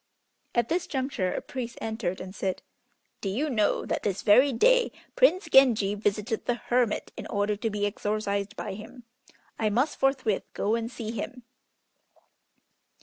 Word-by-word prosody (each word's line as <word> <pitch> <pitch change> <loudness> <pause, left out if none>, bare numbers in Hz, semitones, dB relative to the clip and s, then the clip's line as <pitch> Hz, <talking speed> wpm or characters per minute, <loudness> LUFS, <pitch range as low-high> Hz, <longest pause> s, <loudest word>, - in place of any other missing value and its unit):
At 240 -1 +2
this 345 +2 -1
juncture 260 -9 -1
a - - -3
priest 245 -3 -6
entered 220 -5 -3
and 185 0 -7
said, 190 -2 -3 0.6
"Do 195 - -2
you 280 +10 -1
know 215 -4 +1
that - - -2
this 200 -2 -2
very 255 +7 +6
day - - +4 0.2
Prince 375 -8 +4
Genji 235 -9 +5
visited 210 +2 -1
the 245 - +2
hermit 240 -1 0
in - - -7
order 205 0 0
to 225 +1 -1
be 205 -1 -1
exorcised 205 -1 -2
by 205 - -5
him. 225 +5 -10 0.6
I 215 - +2
must 250 +9 0
forthwith 260 -7 +1
go 210 - 0
and 230 0 -1
see 230 -3 -5
him." 235 +3 -6
225 Hz, 155 wpm, -27 LUFS, 205-255 Hz, 0.6 s, very